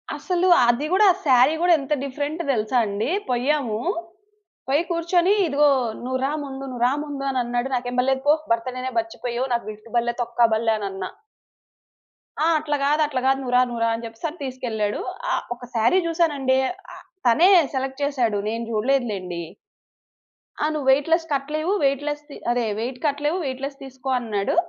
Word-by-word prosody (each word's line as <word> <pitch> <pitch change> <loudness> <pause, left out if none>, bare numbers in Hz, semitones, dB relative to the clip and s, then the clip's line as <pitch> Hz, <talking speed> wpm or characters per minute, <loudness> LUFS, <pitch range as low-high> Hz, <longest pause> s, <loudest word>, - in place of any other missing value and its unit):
అసలు 360 0 0 0.2
అది 240 +5 +2
గూడా 405 +3 +5 0.2
సారీ 260 +2 +5
గూడా 350 0 +5
ఎంత 275 +2 -2
డిఫరెంట్ 290 +4 -3
దెలుసా 220 +1 0
అండి. 205 +6 -2 0.2
పోయాము 250 -3 0 0.9
పోయి 285 +5 +2
కూర్చొని 345 +3 +2
ఇదిగో 295 0 +3 0.4
నువ్వు 260 +1 -1
రా 280 - 0
ముందు, 270 -1 -7
నువ్వు 245 -2 -3
రా 260 - +1
ముందు 285 -2 -6
అని 260 - 0
అన్నాడు 240 +2 -2
నాకేం 245 0 -3
బలే 265 +1 +2
కొ 295 - +7 0.2
భర్త్ 230 +2 +1
డేనే 255 0 -4
మర్చిపోయావు 255 -7 -3
నాకు 235 -3 -1
గిఫ్ట్ 215 +2 -14
బల్లే 240 0 +1
తొక్కా 235 0 +2
బల్లె 225 0 +2
అనన్నా. 195 -2 -4 1.4
ఆ! - - +3
అట్లా 295 -1 -1
గాదు 300 +2 +2
అట్లా 260 -3 -2
గాదు. 270 0 +3
నువ్వు 250 -2 -4
రా - - +6
నువ్వు 235 -1 -4
రా - - +2
అని 225 +1 -4
జెప్పెసని 295 +9 -6
తీసుకెళ్ళాడు. 225 -5 -2 0.3
ఆహ్, - - 0
ఒక 245 0 -11
సారీ 230 +12 +4
జూసానండి 300 -6 +1 0.4
ఆహ్, - - -14 0.2
తనే 320 +11 +6 0.3
సెలెక్ట్ 265 +1 -3
చేసాడు. 250 -7 +1
నేను 230 +1 -3
జూడలేదు 245 +4 +1
లెండి. 180 -3 -5 1.2
ఆ! - - +3
నువ్వు 285 -3 -3
weight 285 +4 +2
less 330 0 +3
కట్టలేవు. 300 +5 -1
Weight 275 0 +2
less 295 0 -3
the - - -9
అదే 245 0 +1 0.2
వెయిట్ 245 +3 -3
కట్టలేవు 295 +4 0
వెయిట్ 260 0 -4
లెస్ 275 0 -4
తీసుకో 265 0 -7
అన్నాడు. 210 -2 -1
265 Hz, 175 wpm, -23 LUFS, 235-295 Hz, 1.4 s, కొ